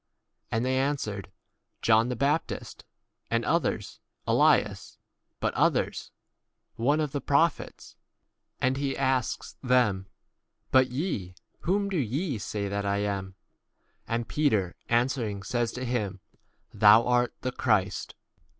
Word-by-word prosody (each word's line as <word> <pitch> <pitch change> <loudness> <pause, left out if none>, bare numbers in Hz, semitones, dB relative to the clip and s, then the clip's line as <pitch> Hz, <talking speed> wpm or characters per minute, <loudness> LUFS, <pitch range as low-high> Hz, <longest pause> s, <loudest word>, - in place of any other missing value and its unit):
And 115 +2 0
they 130 0 +1
answered, 110 -9 -2 0.5
John 115 +1 +4
the 125 - -1
baptist; 140 +6 -2 0.4
and - - 0
others, - - -1 0.3
Elias; - - +2 0.4
but - - 0
others, - - +1 0.7
One 145 +7 +2
of 150 -3 -1
the 145 - -3
pro 145 +4 +4
29 - - -15
phets. - - -12 0.6
And 130 +1 +1
he 140 -1 -2
x - - -7
asks? 130 -3 -1
them, 120 -7 +2 0.6
But 130 -1 +5
ye, 125 - -3 0.2
whom 200 +3 0
do 195 -2 -2
ye 135 - -1
say 100 +1 -3
that 100 +1 -2
I 100 0 0
am? 100 -2 -3 0.7
And 115 0 -2
Peter 110 -12 +1
answering 120 -4 0
says 120 +2 -1
to 125 +1 -4
him, 105 -6 -2 0.5
30 - - -15
Thou 110 +2 +7
art 125 -1 +2
the 130 - -2
Christ. 105 -6 0
120 Hz, 135 wpm, -28 LUFS, 105-135 Hz, 0.7 s, Thou